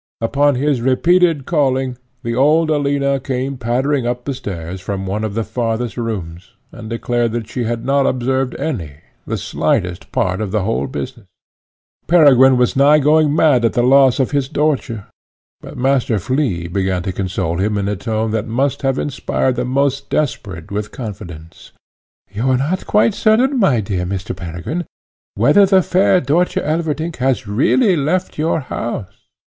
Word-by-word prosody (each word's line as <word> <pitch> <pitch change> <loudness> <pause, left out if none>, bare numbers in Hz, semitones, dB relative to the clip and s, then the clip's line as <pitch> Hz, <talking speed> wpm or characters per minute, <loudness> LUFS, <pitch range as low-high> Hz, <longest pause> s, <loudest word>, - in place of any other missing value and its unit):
Upon 140 +5 +2
his 140 -1 0
repeated 165 +3 +2
calling, 135 -5 0 0.3
the 115 -1 -2
old 155 +5 +3
Alina 140 -2 +1
came 135 +1 -3
pattering 125 +2 -1
up 120 0 -3
the 140 - -2
stairs 95 -7 -6
from 95 0 -4
one 100 +3 -3
of 105 -2 -3
the 115 - 0
farthest 115 0 -3
rooms, 95 -7 -5 0.2
and 110 -2 -9
declared 115 0 -1
that 115 -2 -3
she 125 -2 -3
had 115 0 -3
not 140 +1 +2
observed 130 0 -1
any, 85 - -4 0.3
the - - -2
slightest, 90 +1 -2
part 95 -1 -1
of 105 - -2
the 105 0 -1
whole 115 +3 -1
business. 125 -5 -7 0.8
Peregrine 135 -6 +6
was 125 -1 +1
nigh 140 +3 +5
going 150 0 +3
mad 145 -7 +4
at 115 - +2
the 120 - +1
loss 135 +1 +5
of 130 - +1
Dörtje, 140 -5 -1 0.5
but - - -11
Master 130 -3 +1
Flea 105 - -1
began 95 0 -1
to 95 - -2
console 90 -3 -2
him 105 +2 0
in 100 -1 -1
a 105 - -1
tone 110 +2 -2
that 110 0 -2
must 130 +4 -1
have 135 -1 0
inspired 130 -2 -1
the - - -2
most 140 +1 0
desperate 100 - -3
with 105 +1 -3
confidence: 85 -8 -9 0.6
"You 115 +6 -1
are 130 - +3
not 155 +8 -1
yet - - -16
quite 210 +1 +3
certain, 245 +6 +2
my 140 - +3
dear 95 -3 -3
Mr. 95 0 -4
Peregrine, 90 - -5 0.5
whether 195 - +5
the 190 -1 +4
fair 185 +1 +3
Dörtje 165 +5 0
Elverdink 160 +1 -2
has 130 -1 0
really 165 - +2
left 165 +4 -1
your 160 +1 0
house. 115 -6 -6
125 Hz, 165 wpm, -18 LUFS, 105-145 Hz, 0.8 s, Peregrine